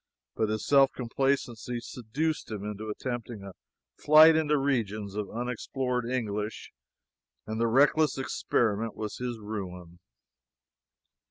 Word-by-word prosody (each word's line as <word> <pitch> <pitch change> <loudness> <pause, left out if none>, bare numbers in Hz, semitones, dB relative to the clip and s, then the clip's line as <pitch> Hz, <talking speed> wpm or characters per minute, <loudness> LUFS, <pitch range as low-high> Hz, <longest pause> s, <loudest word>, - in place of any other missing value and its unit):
But 110 - 0
his 110 0 -2
self 135 -2 +5
complacency 125 -1 -1
seduced 130 +7 -3
him 105 -3 -5
into 105 +1 -5
attempting 120 -1 -5
a 100 - -8 0.5
flight 155 +2 +8
into 150 -1 +2
regions 110 -7 -1
of 105 -1 -4
unexplored 125 +1 -3
English, 105 -4 -3 0.7
and 110 +1 -3
the 115 - +3
reckless 145 +4 +3
experiment 115 -4 0
was 105 -1 -5
his 125 -2 -4
ruin. 90 -5 -7
115 Hz, 115 wpm, -28 LUFS, 105-135 Hz, 0.7 s, flight